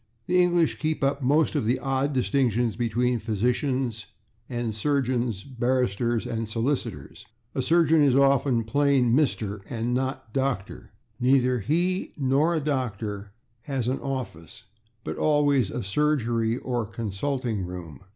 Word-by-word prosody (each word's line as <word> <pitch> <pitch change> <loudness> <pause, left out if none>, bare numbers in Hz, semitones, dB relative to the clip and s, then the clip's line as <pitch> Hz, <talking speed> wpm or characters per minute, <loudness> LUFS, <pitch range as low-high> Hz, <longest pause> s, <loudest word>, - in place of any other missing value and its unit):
The 180 0 +3
English 175 -2 +2
keep 155 -1 -1
up 140 +1 +1
most 145 +5 +2
of 145 - 0
the 120 +4 +2
old 135 +2 -1
distinctions 125 -4 +1
between 120 +1 0
physicians 120 +2 -1 0.4
and 120 -3 -2
surgeons, 120 -3 0
barristers 120 -3 0
and 115 -2 -3
solicitors. 120 +5 -3 0.3
A - - -1
surgeon 160 +2 +4
is 140 -3 +4
often 135 -3 +3
plain 135 0 +2
/Mr./, 110 -8 0
and 120 +1 -2
not 130 -2 -3
/Dr./ 130 -7 -2 0.3
Neither 125 0 +3
he 175 - -1
nor 145 +5 +2
a - - +1
doctor 110 -8 -3 0.3
has 135 -4 -2
an 130 +2 0
/office/, 130 - -6 0.4
but - - -5
always 145 -7 +3
a 125 - -4
/surgery/ 115 -2 +1
or 120 -4 -2
/consulting 115 0 -2
room 90 -5 -8
125 Hz, 130 wpm, -26 LUFS, 115-140 Hz, 0.4 s, surgeon